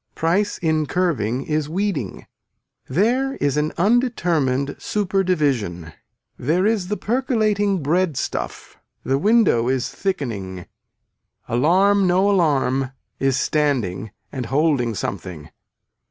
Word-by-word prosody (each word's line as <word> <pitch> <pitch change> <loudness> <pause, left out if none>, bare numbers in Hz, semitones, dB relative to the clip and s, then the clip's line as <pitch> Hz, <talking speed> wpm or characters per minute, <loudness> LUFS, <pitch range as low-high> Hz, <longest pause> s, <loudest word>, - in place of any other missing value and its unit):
Price 185 +6 +1
in 155 -3 0
curving 135 - 0
is 150 -1 -1
weeding. 175 - -2 0.6
There 245 - +1
is 145 - 0
an 150 +1 0
undetermined 170 - +1
super 195 -2 0
division. 120 - -1 0.5
There 165 +9 +1
is 210 -4 +1
the 210 +2 -2
percolating 215 - 0
bread 165 0 +1
stuff, - - -5 0.2
the 135 +1 0
window 205 - +3
is 130 0 0
thickening. 115 - -4 0.8
Alarm 185 +10 +3
no 190 +3 +3
alarm 135 -7 +1 0.3
is 135 -1 +1
standing 125 - 0 0.2
and 130 -4 -4
holding 135 -5 +1
something. 85 -6 -5
155 Hz, 110 wpm, -21 LUFS, 130-195 Hz, 0.8 s, window